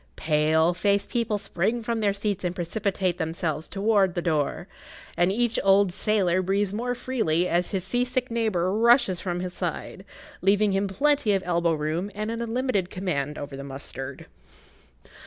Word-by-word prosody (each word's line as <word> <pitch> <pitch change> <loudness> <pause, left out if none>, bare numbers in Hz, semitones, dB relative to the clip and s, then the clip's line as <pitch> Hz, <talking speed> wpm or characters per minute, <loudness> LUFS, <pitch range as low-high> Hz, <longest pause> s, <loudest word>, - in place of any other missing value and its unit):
Pale 155 +2 +2
faced 200 +2 0
people 230 -3 0
spring 205 +3 -1
from 230 0 -1
their 205 -2 +2
seats 200 -1 -2
and 180 0 -2
precipitate 185 0 -1
themselves 160 -1 -2
towards 200 -2 +2
the 175 - 0
door, 155 -4 -1 0.5
and 175 +2 +3
each 235 +2 +1
old 195 -1 +4
sailor 190 -3 +1
breathes 195 +1 0
more 245 +3 -2
freely 220 -9 0
as 175 0 +1
his 190 -3 -2
sea 245 +6 0
sick 250 0 -2
neighbour 205 -6 0
rushes 230 -5 +4
from 175 -2 -3
his 180 -1 -4
side, - - -4 0.4
leaving 200 +2 +3
him 195 +1 +1
plenty 275 +2 +2
of 195 -1 0
elbow 170 -1 +1
room 155 +5 -2
and 215 +2 -3
an 230 0 -4
unlimited 235 -5 -1
command 150 -7 -2
over 145 -1 -6
the 140 - -7
mustard. 135 -1 -7
195 Hz, 165 wpm, -25 LUFS, 170-220 Hz, 0.5 s, old